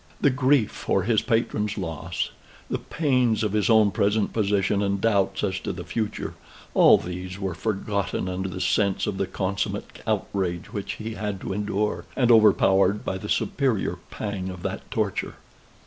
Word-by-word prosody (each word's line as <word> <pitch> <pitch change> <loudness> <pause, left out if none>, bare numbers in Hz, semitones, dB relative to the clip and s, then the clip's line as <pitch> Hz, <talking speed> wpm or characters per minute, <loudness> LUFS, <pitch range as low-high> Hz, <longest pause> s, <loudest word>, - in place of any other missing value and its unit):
The 140 - +4
grief 130 -3 +3
for 95 - 0
his 110 +1 +2
patron's 110 -3 0
loss; 80 +2 -3 0.4
the - - 0
pains 125 -8 +1
of 105 -2 0
his 105 +1 +2
own 110 -2 +5
present 100 +2 +1
position, 100 -1 +1
and 100 -1 0
doubts 100 -2 +1
as 95 -2 0
to - - -4
the 90 0 -6
future: 110 +1 -3 0.4
all - - +7
these 90 +1 -6
were 95 -3 -3
forgotten 100 0 -2
under 95 +1 -3
the 95 0 -5
sense 100 -2 +1
of 95 - -2
the 100 - 0
consummate 95 0 -3
outrage 90 -3 -2
which 100 -2 -3
he 110 +1 -6
had 105 -3 -3
to - - -3
endure, 105 +1 -1
and 125 -2 +3
overpowered 105 -2 +5
by 95 - -2
the 105 - -7
superior 130 -8 0
pang 100 -3 -4
of 90 -2 -8
that - - -4
torture. - - -2
100 Hz, 165 wpm, -25 LUFS, 95-110 Hz, 0.4 s, all